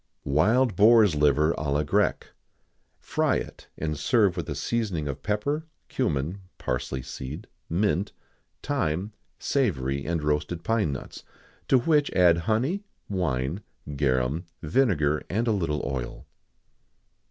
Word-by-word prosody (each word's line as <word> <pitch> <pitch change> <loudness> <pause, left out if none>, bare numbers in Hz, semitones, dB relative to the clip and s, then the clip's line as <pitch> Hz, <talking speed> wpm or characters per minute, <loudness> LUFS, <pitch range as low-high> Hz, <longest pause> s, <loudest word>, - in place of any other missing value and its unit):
[XIX - - -7
82] - - -1
Wild 115 - +3
Boar's 110 -1 +6
Liver 75 +2 +3
à 75 -2 -2
la 75 +1 +1
Grecque. 70 - 0 0.7
Fry - - 0
it, - - -5
and 75 0 -2
serve 105 -7 +3
with 85 -2 -4
a 75 - -3
seasoning 90 -1 -1
of 70 - -5
pepper, 140 +10 -1 0.2
cummin, 85 - -1 0.2
parsley 65 +1 -3
seed, 65 +2 -7 0.2
mint, 100 +2 +1 0.5
thyme, 105 - -1 0.2
savory, 70 - 0
and 85 -2 -1
roasted 75 +3 -1
pine 110 -6 +1
nuts; 70 - -7 0.4
to 135 - +5
which 145 +3 +2
add 85 -2 +5
honey, 135 - +1 0.3
wine, 85 -3 -1 0.3
garum, 70 +4 0 0.2
vinegar, 75 - +2
and 115 +6 0
a - - +3
little 80 -8 -1
oil. 65 -3 -5
85 Hz, 130 wpm, -26 LUFS, 75-110 Hz, 0.7 s, Boar's